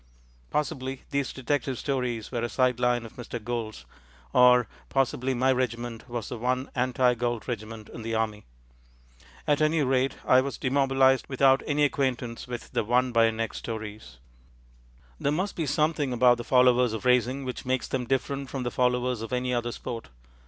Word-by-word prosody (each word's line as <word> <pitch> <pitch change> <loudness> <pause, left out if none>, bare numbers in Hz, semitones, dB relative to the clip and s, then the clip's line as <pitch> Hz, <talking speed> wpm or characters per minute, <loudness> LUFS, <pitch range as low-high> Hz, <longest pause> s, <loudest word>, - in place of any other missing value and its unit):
Possibly 135 - -2
these 140 -1 -1
detective 135 0 -2
stories 125 -5 -2
were 120 -3 -2
a 120 - -1
side 125 -1 +1
line 120 -1 +1
of 115 - -12
Mr. 120 -1 -5
Gould's, 115 - -5 0.5
or 125 -2 +6 0.2
possibly 135 -1 0
my 130 +2 +3
regiment 120 -2 -2
was 120 -2 -4
the 120 - -6
one 130 +3 -1
anti 125 0 +2
Gould 120 -2 -2
regiment 110 -2 -5
in 115 - -9
the 115 0 -3
Army. 110 -2 -1 1.0
At 145 0 +2
any 155 0 +3
rate, 130 0 +1
I 130 - +6
was 140 +1 -4
demobilized 135 0 +3
without 135 0 +4
any 150 0 +2
acquaintance 130 -5 -1
with 120 -1 -7
the - - 0
Won 125 +3 +2
by 115 -1 +5
a 115 - +3
Neck 115 0 -3
stories. 105 - -7 1.0
There 140 - +1
must 185 +6 -1
be 160 -3 -2
something 150 -1 +1
about 125 0 +5
the 120 - -5
followers 125 -1 +4
of 110 +3 -5
racing 125 +2 +2
which 125 - -5
makes 130 -1 -1
them 125 -2 -2
different 135 +1 -1
from 135 -2 -4
the 120 - -2
followers 125 -1 +1
of 115 - -6
any 125 0 -1
other 120 0 -1
sport. 115 0 -6
125 Hz, 175 wpm, -27 LUFS, 120-135 Hz, 1.0 s, or